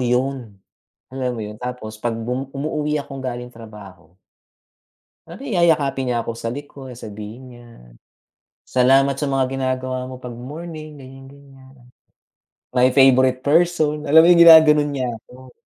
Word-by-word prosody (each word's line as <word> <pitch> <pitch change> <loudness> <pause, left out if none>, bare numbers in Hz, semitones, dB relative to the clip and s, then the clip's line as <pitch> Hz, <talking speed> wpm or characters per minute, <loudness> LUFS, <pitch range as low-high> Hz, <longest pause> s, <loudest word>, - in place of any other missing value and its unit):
'yon. 125 -3 -2 0.6
Alam 130 -1 -3
mo - - -6
'yon, 105 0 -9
tapos 125 -4 -7
'pag 115 -1 -2
bum 125 +4 -4
umuuwi 150 +1 -2
akong 140 -2 -6
galing 125 -1 -6
trabaho 105 -7 -14 1.1
Ano 170 +3 -11
yayakapin 150 - +1
niya 120 - 0
ako 115 - -4
sa 115 0 -5
likod 135 -2 -9
sabihin 110 +3 -10
niya. 120 0 -16 1.0
"Salamat 135 +2 +3
sa 140 +1 -4
mga 135 -1 +1
ginagawa 130 -1 -3
mo 130 - -9
'pag 125 -1 -9
morning 155 +4 -9
ganiyan, 135 0 -13
ganiyan. 135 -1 -18 1.0
My 125 0 +4
favorite 130 -1 +3
person." 155 -1 +1
Alam 160 +2 +7
mo - - +5
'yung 170 - +4
ginaganon 155 -3 +7
niya 135 -3 -3 0.2
ako, 130 +1 -17
130 Hz, 140 wpm, -20 LUFS, 125-145 Hz, 1.1 s, Alam